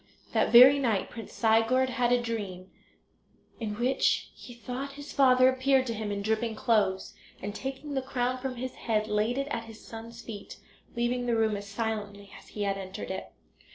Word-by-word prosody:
That - - +2
very 255 +4 +9
night 225 -7 0
Prince 225 -2 -8
Sigurd 230 +3 +3
had 245 -2 +1
a 245 - +4
dream, 200 -6 -5 0.9
in 215 -3 -3
which 245 +4 +1
he 250 - -12
thought 255 +4 -6
his 285 +1 -9
father 255 -2 +5
appeared 260 0 +3
to 235 - -2
him 215 -1 -4
in 200 0 -3
dripping 220 +1 0
clothes, 210 -5 +1 0.3
and, 205 +1 -5
taking 270 +5 -5
the 265 - 0
crown 255 -1 -1
from 260 0 -4
his 255 +1 -5
head, 215 -2 -1
laid 215 +4 0
it 275 0 -1
at 230 -4 -3
his 225 -1 -13
son's 230 +1 -9
feet, 210 -3 -8 0.4
leaving 245 +1 0
the 235 - +2
room 220 -2 +2
as 200 0 -7
silently 205 -2 -4
as - - -14
he 210 - -4
had 195 -1 -1
entered 190 0 -6
it. 190 - -6
230 Hz, 190 wpm, -29 LUFS, 210-255 Hz, 0.9 s, very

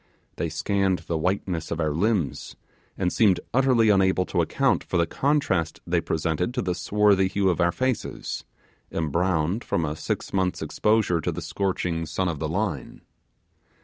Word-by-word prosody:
They 85 - -1
scanned 95 +3 0
the 85 - -2
whiteness 90 0 -1
of 85 - -3
our 80 -2 +1
limbs, 90 - -1 0.4
and 90 -2 0
seemed 100 -5 +4
utterly 125 -3 +4
unable 95 -2 +3
to - - 0
account - - +1
for 90 - -2
the 85 - +3
contrast 95 - 0
they - - +1
presented 80 - -1
to 125 - 0
the 90 - 0
swarthy 100 0 +3
hue 95 0 +1
of 85 - -1
our 85 0 +3
faces 130 +3 -3 0.5
embrowned 85 - 0
from 85 - -1
a 75 0 -3
six - - -4
months' 95 -2 0
exposure 105 -6 +1
to - - -1
the - - -5
scorching 90 -4 -2
sun 90 +3 -1
of 80 -4 -4
the 80 - -2
Line. 85 - -3
90 Hz, 165 wpm, -25 LUFS, 80-100 Hz, 0.5 s, seemed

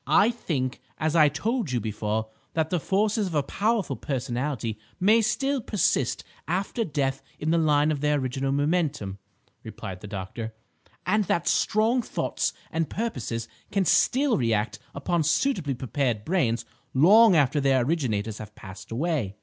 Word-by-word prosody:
"I 200 +10 +5
think, 135 - -3 0.2
as 155 +1 0
I 155 -3 +6
told 215 - -1
you 125 - +1
before, 110 0 -2 0.3
that 160 -1 0
the 180 - +1
forces 205 +4 +1
of 170 - -5
a 145 - +2
powerful 210 +7 0
personality 125 -4 -3 0.2
may 215 +5 +5
still 270 +5 0
persist 195 - 0 0.2
after 195 +7 -1
death 135 -6 -1 0.2
in 155 +1 -1
the 170 - +3
line 150 -1 +3
of 145 -3 -2
their 150 0 +2
original 135 0 -1
momentum," 145 - 0 0.4
replied 95 -1 -7
the - - -8
doctor; 105 +3 -6 0.5
"and 210 +3 +2
that 170 -1 0
strong 225 +4 +2
thoughts - - -1 0.2
and 165 -1 -1
purposes 120 - -3 0.2
can 195 -2 +1
still 260 - +3
react 110 -3 0 0.2
upon 165 +4 0
suitably 170 - +1
prepared 120 -3 -1
brains 120 -10 +1 0.3
long 200 - +7
after 145 -1 +3
their 135 -2 +3
originators 115 -9 -1
have 110 0 -9
passed 95 -1 -11
away. 130 - -1
145 Hz, 150 wpm, -26 LUFS, 120-185 Hz, 0.5 s, long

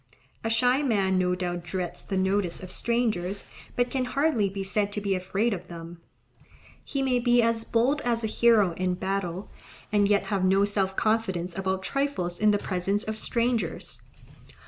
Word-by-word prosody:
A 225 - -1
shy 250 +4 +3
man 195 -8 +2
no 180 0 +1
doubt 175 -1 -3
dreads 175 0 -4
the 195 - -3
notice 190 -1 0
of 185 - -8
strangers, 215 -5 -1 0.3
but 245 0 +1
can 260 -2 0
hardly 265 -6 +1
be 195 0 -4
said 205 +1 0
to 210 - -1
be 200 -1 0
afraid 190 +5 0
of 180 -2 -6
them, 170 0 -9 0.8
he 275 -1 -2
may 255 -2 +2
be 240 0 +3
as 230 0 +1
bold 245 +7 +1
as 235 -1 0
a - - +1
hero 225 -6 +4
in 185 0 0
battle, 190 0 -3 0.4
and 205 -1 +3
yet 205 0 +3
have 195 -2 +1
no 195 +2 +4
self 195 -2 -1
confidence 190 -6 0
about 190 0 -1
trifles 190 -10 -1
in 215 - +4
the 205 - +4
presence 195 +2 -1
of 220 0 -4
strangers. 235 -8 -1
200 Hz, 175 wpm, -27 LUFS, 185-230 Hz, 0.8 s, hero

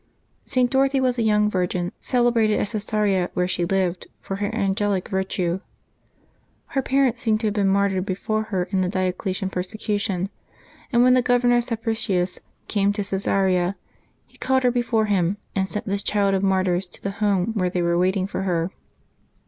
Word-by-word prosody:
[t. 255 -2 +2
Dorothy 270 +2 +2
was 255 -2 +1
a - - +2
young 210 -1 +3
virgin, 180 -2 -1
celebrated 235 -4 +2
at 205 - -1
Caesarea, 210 -4 0
where 180 0 +1
she 175 -1 0
lived, 185 -1 -1
for 195 - -5
her 205 0 -1
angelic 195 -1 0
virtue. 190 -2 -1 1.1
Her 270 - 0
parents 260 -3 +1
seem 220 -3 +2
to 220 - -3
have 210 - +1
been 205 -2 +1
martyred 195 -1 +2
before 215 +3 -2
her 190 -4 -1
in 190 -2 +1
the 180 - 0
Diocletian 185 0 -2
persecution, 195 0 -2 0.6
and 240 -1 +4
when 250 0 +6
the 255 - +4
Governor 245 0 +3
Sapricius 225 -6 -1 0.3
came 200 -1 +2
to 205 - -2
Caesarea 190 -1 +1 0.5
he - - -22
called 260 0 +1
her 250 - +4
before 235 -2 +1
him, 195 -2 +1 0.2
and 190 -1 +1
sent 210 - -4
this 200 0 -1
child 200 -1 +1
of 190 - +1
martyrs 190 -1 +1
to 180 - -14
the 200 - -2
home 205 0 +1
where 185 -4 0
they 180 -1 -1
were 170 0 +1
waiting 185 +2 +1
for 195 - -4
her. 175 -2 -1
200 Hz, 175 wpm, -23 LUFS, 185-225 Hz, 1.1 s, when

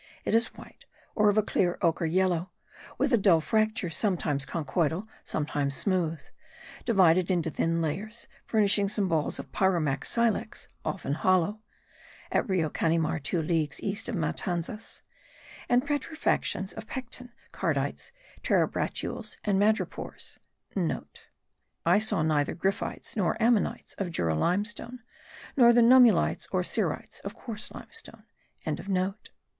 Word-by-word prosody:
It - - 0
is 230 +1 +4
white, - - -14 0.3
or 210 -1 +5
of 205 - +1
a 215 - +5
clear 180 -3 +1
ochre 165 0 +2
yellow, 180 0 +1 0.5
with - - +1
a 235 - +5
dull 190 -5 +5
fracture, 215 +1 0
sometimes 160 -9 0
conchoidal, 170 +4 -1 0.2
sometimes 145 -2 -1
smooth; 165 -5 0 0.6
divided 185 -5 +4
into 170 -3 +1
thin 165 +2 0
layers, 210 +9 -4 0.2
furnishing 205 -2 +3
some 205 -1 0
balls 160 -4 0
of - - -8
pyromac 165 -8 +1
silex, 230 -2 0 0.2
often 160 -7 -2
hollow 185 +6 +2 0.7
(at - - +1
Rio 180 -4 +2
Canimar 160 +1 0
two 160 +3 -1
leagues 155 -3 0
east 200 +3 -2
of 235 - -2
Matanzas), 175 +4 -3 0.7
and 245 +1 +3
petrifications 290 - -1
of 220 - -8
pecten, 250 -1 -6 0.2
cardites, - - -2 0.3
terebratules 220 -4 -1
and 200 -2 +2
madrepores.* 205 -3 -1 0.7
(* - - -26
I - - +5
saw 215 -6 0
neither 150 -2 +1
gryphites 195 +3 -2
nor 205 +1 0
ammonites 230 -1 +1
of 195 -3 -1
Jura 85 - 0
limestone 210 - -1 0.5
nor 240 -4 +7
the 240 0 +5
nummulites 245 -1 +5
and - - +1
cerites - - -2
of - - -7
coarse 220 -4 -7
limestone.) 455 - -10
190 Hz, 130 wpm, -28 LUFS, 165-220 Hz, 0.7 s, nor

